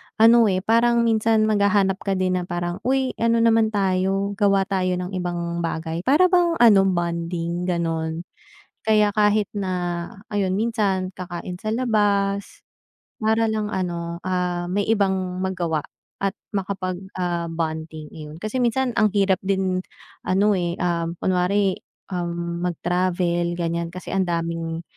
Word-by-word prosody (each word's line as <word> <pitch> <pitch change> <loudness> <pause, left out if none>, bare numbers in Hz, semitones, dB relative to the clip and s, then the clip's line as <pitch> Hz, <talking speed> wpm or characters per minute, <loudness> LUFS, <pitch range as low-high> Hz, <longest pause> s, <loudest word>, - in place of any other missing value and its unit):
ano, 230 +1 +6
eh, 185 -2 0
parang 235 +2 +3
minsan 225 -1 +3
maghahanap 200 -2 +2
ka 195 -1 -1
din 185 -1 +1
na - - -3
parang, 175 0 -3
"Uy, 265 0 +1
ano 230 0 +3
naman 225 -1 +4
tayo, 195 0 +1
gawa 200 -2 +4
tayo 185 -2 0
ng 180 +1 -4
ibang 175 -2 -3
bagay," 165 0 -3
para 355 +7 +5
bang 350 -2 +3
ano, 225 -8 +6
bonding, 170 0 -2
gano'n. 165 -1 -1 0.6
Kaya 210 -1 +3
kahit 210 -1 +3
na, 195 -2 -2 0.6
ayun 195 -3 0
minsan, 205 -5 0
kakain 180 0 -6
sa 215 +4 -4
labas, 205 -4 0 0.6
para 220 +1 +2
lang 215 -1 -2
ano, 170 -3 -3
ah, 180 -1 -1
may 200 +2 +1
ibang 190 -4 0
magawa 170 -5 -1 0.4
at 195 +1 -1 0.2
makapag, 190 -2 -2 0.2
ah, 175 -2 -1
bonding, 160 -1 -4
ayun. 150 -1 -9
Kasi 215 +6 -3
minsan, 250 +1 +1
ang 215 -2 +3
hirap 195 -2 +3
din 190 -1 0 0.4
ano, 200 +3 +2
eh, 175 -2 -1
um, 170 -1 -1
kunwari, 185 +1 +1 0.4
um, 170 -1 -3
mag-travel, 175 0 0
ganiyan, 170 0 -1
kasi 185 +1 -8
ang 195 0 +2
daming 165 -1 -2
185 Hz, 140 wpm, -23 LUFS, 175-210 Hz, 0.6 s, ano